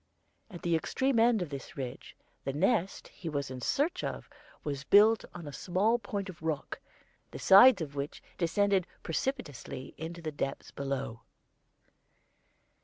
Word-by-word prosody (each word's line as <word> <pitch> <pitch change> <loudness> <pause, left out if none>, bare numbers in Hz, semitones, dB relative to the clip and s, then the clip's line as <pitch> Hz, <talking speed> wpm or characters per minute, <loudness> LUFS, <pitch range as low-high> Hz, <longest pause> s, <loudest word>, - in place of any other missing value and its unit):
At 175 - -10
the 170 -1 +2
extreme 260 - +1
end 225 -4 +4
of 155 - -8
this 140 +1 -8
ridge 130 -1 -6 0.3
the 135 - -2
nest 190 - 0
he 170 - -7
was 140 -3 -3
in 130 -1 -6
search 290 - 0
of - - -4 0.4
was 140 -2 -3
built 210 +8 +6
on 175 -2 -7
a 145 - -7
small 205 +9 +1
point 200 -2 -4
of 180 -5 -10
rock, 160 -3 -3 0.5
the - - -8
sides 200 0 +8
of 140 -2 -8
which 140 +1 -4 0.2
descended 190 +1 +2 0.2
precipitously 165 - -4
into 165 +2 -6
the 160 -2 -4
depths 140 -2 -4
below. 135 -4 -4
170 Hz, 150 wpm, -31 LUFS, 140-205 Hz, 0.5 s, sides